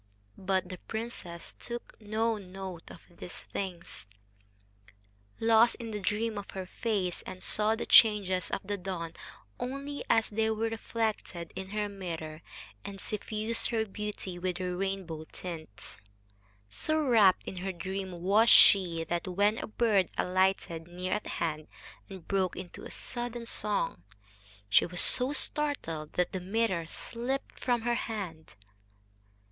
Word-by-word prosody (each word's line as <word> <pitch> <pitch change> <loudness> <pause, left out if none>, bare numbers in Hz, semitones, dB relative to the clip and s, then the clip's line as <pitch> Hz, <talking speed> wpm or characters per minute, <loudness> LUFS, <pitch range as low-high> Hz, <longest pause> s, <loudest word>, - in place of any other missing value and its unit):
But 190 -1 +1
the 185 -1 -7
princess 220 -7 -5
took 240 0 -6
no 220 +2 +1
note 185 -2 -8
of 170 - -12
these 175 0 -7
things, 175 - -5 1.3
lost 230 +1 +5
in 230 -2 -6
the 210 - -3
dream 210 +2 0
of 200 - -9
her 190 - -3
face, 195 -3 -1
and 185 0 -6
saw 215 +1 +3
the 225 - -4
changes 200 -5 +6
of - - -2
the 205 +1 -3
dawn 175 -3 -4 0.5
only 275 +3 -4
as 225 -1 +4
they 220 +1 +1
were 220 +1 0
reflected 220 -6 -3
in 190 0 -5
her 210 0 -1
mirror 165 -5 -6 0.4
and 195 -1 -7
suffused 215 +2 -1
her 225 -2 +1
beauty 205 -3 -5
with 180 0 -1
their 180 -1 -2
rainbow 185 -4 -3
tints. 160 - -8 0.7
So 310 - 0
rapt 225 -10 +5
in 185 - -6
her 190 +2 -2
dream 185 0 -5
was 210 +5 +5
she 175 -5 +7
that, 170 +2 -2
when 205 +4 +2
a - - -4
bird 215 -4 +2
alighted 180 -3 +1
near 180 +1 -3
at 210 - -2
hand 155 -2 -2 0.4
and 190 -4 -10
broke 190 -2 +1
into 185 -1 -8
sudden 240 -1 -3
song, 205 - -1 0.7
she 100 +3 +5
was 180 0 0
so 255 +2 +5
startled 285 - -2
that 180 - +1
the 190 - -2
mirror 190 -3 0
slipped 245 +9 -4
from 245 -2 +1
her 240 +1 +1
hand. 195 -9 -4
195 Hz, 140 wpm, -31 LUFS, 180-225 Hz, 1.3 s, she